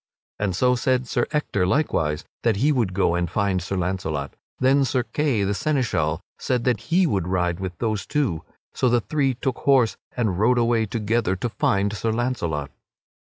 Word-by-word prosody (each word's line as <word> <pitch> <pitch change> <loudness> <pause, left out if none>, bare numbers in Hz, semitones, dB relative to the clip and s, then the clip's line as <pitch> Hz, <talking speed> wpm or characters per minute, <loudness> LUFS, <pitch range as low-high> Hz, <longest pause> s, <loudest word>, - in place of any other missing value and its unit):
And 100 -4 -1
so 125 +6 +3
said 125 0 +1
Sir 120 - 0
Ector 105 - 0
likewise, 80 - 0 0.2
that 115 -3 +2
he 140 +9 +2
would 115 -10 0
go 90 -3 +2
and 85 -1 0
find 95 0 0
Sir 95 +2 -3
Launcelot. 85 -6 -2 0.2
Then 135 +2 +4
Sir 130 -1 0
Kay 135 -5 0
the 100 +1 0
Seneschal 100 - 0 0.2
said 125 -2 0
that 125 -1 +1
he 180 +3 +4
would 95 - 0
ride 90 -1 0
with 95 -3 -5
those 110 -3 -2
two; 130 - 0 0.3
so 125 - +2
the 120 0 +3
three 135 +5 0
took 130 0 -2
horse 125 -8 +3 0.2
and 105 -7 0
rode 120 +4 +3
away 115 -2 +2
together 110 -2 0
to 120 +6 -3
find 100 -1 +1
Sir 110 +1 -1
Launcelot. 85 - -2
110 Hz, 180 wpm, -23 LUFS, 90-125 Hz, 0.3 s, Then